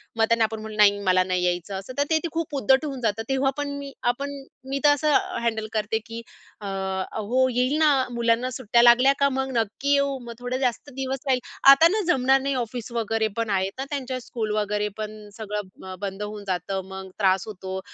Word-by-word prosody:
मग 225 -1 +3
त्यांना 230 -1 +3
आपण 220 0 -1
म्हणलं 215 0 -8
"नाही 205 -1 +5
मला 185 0 +4
नाही 185 -1 -1
यायचं." 180 +2 -2
असं 195 +7 -9
तर 285 - +3
ते 320 - +3
ते - - -1
खूप 325 -3 -3
उद्धट 265 +6 +3
होऊन 270 -4 -5
जातं. 225 -1 0
तेव्हा 270 0 +2
पण 285 -1 -3
मी 280 -1 -7 0.2
आपण 280 +3 -5 0.4
मी 275 +1 -1
तर 295 - +7
असं 295 0 +3 0.3
हँडल 220 -2 -1
करते 215 0 0
की 230 0 -7 0.4
"अ, - - -7
हो 195 +6 -1
येईल 255 +4 +2
ना 310 -1 +5 0.2
मुलांना 235 +1 +1
सुट्ट्या 235 -1 +3
लागल्या 245 +3 +6
का 280 0 +4
मग 265 0 -2
नक्की 230 +6 0
येऊ, 280 -1 +2
मग 240 -1 -8
थोडे 245 +1 -3
जास्त 255 +2 -1
दिवस 265 0 -3
राहील. 260 -1 +3 0.3
आता 320 +4 +7
ना 420 +5 0
जमणार 265 +1 +3
नाही 275 0 -1
ऑफिस 235 0 -7
वगैरे 225 -1 0
पण 230 -1 -1
आहेत 190 -2 +1
ना, 265 - -2
त्यांच्या 260 -3 -3
स्कूल 230 -3 -4
वगैरे 210 0 0
पण 215 -1 -7
सगळं 205 -3 -6
बंद 195 0 -4
होऊन 210 0 -6
जातं 190 +1 -2
मग 190 0 -7
त्रास 190 -2 +3
होतो. 190 -2 -6
230 Hz, 205 wpm, -24 LUFS, 205-270 Hz, 0.4 s, तर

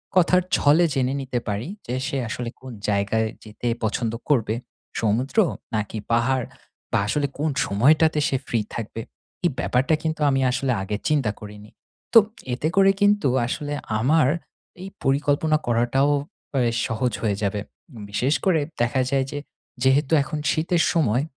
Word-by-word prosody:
কথার 180 0 +5 0.2
ছলে 150 +4 +4
জেনে 130 0 0
নিতে 130 -2 -2
পারি 105 +5 -2 0.2
যে, 125 - -2
সে 140 - -2
আসলে 120 +1 -4
কোন 130 -1 -9 0.2
জায়গায় 100 +2 +1 0.2
যেতে 110 +2 -6 0.2
পছন্দ 110 +1 -1 0.2
করবে? 115 -6 +2 0.5
সমুদ্র? 115 - 0 0.4
নাকি 105 +1 -2
পাহাড়? 125 +2 +2 0.5
বা - - +3
আসলে 145 +6 0
কোন 155 +2 0 0.2
সময়টাতে 155 +9 +3
সে 135 - +1
ফ্রি 115 - 0 0.2
থাকবে? 115 0 -5 0.4
এই - - +5
ব্যাপারটা 135 +6 +2
কিন্তু 160 -1 -2
আমি 135 -1 +2
আসলে 130 +1 0
আগে 100 +2 -3
চিন্তা 140 -9 +2
করিনি। 105 0 -11 0.4
তো 230 - +11 0.3
এতে 130 +5 -1
করে 195 0 +6
কিন্তু 205 -6 +4 0.2
আসলে 145 +3 -3 0.3
আমার 150 +5 +3 0.5
এই 190 - -6
পরিকল্পনা 145 +3 +2
করাটাও 120 +4 +2 0.4
অ্যা 135 - +2 0.3
সহজ 115 +2 -1
হয়ে 105 -3 +1
যাবে। 100 +1 0 0.5
বিশেষ 125 +7 +1
করে 175 -5 +3 0.2
দেখা 120 +3 +2
যায় 135 -1 +2
যে, 145 - -3 0.4
যেহেতু 135 +3 +3
এখন 150 +1 -4
শীতের 165 +2 +1
সময়, 135 -6 +2
130 Hz, 150 wpm, -23 LUFS, 115-150 Hz, 0.5 s, তো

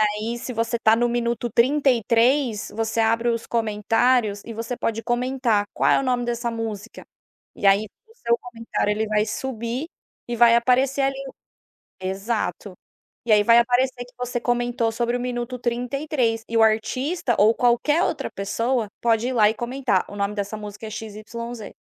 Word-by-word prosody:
E 215 - +5 0.3
aí, 240 - -3
se 250 - -6
você 230 0 -1
está 220 -1 +4
no 240 +1 +1
minuto 240 0 -1
33, 245 -2 +2
você 225 +1 -1
abre 230 +1 +2
os 230 -1 -3
comentários 225 0 +1
e 230 - -6
você 230 +2 -4
pode 225 -1 -2
comentar: 240 -2 0
"Qual - - +2
é - - +5
o - - -1
nome 250 -1 0
dessa 235 0 -2
música?". 225 -1 -6 0.5
E 200 - -1
aí 200 +2 +4 0.2
o 450 - -21
seu 235 - +1
comentário 230 -3 -3
ele 220 +1 -1
vai 210 0 +1
subir 240 +4 -4 0.4
e 240 - -2
vai 235 0 +6
aparecer 255 +3 +2
ali. 270 0 0 0.8
Exato. 195 +1 -3 0.5
E 230 - +3
aí 210 -1 +6
vai 230 +2 +6
aparecer 245 +1 +1
que 250 - -20
você 245 0 -2
comentou 240 -1 0
sobre 240 +1 -1
o - - -4
minuto 245 0 -3
33, 245 0 -1
e 230 - -2
o 225 - +5
artista 240 +6 +1
ou 215 +2 +5
qualquer 245 +7 +2
outra - - -2
pessoa 230 +4 -1
pode 230 +1 +2
ir - - -2
lá 215 -4 +5
e 220 - -4
comentar 240 -4 -1
o - - -9
nome 200 +1 -1
dessa 205 +1 -3
música 210 +1 -8
é - - -7
XYZ. 220 +1 -7
235 Hz, 175 wpm, -23 LUFS, 220-245 Hz, 0.8 s, vai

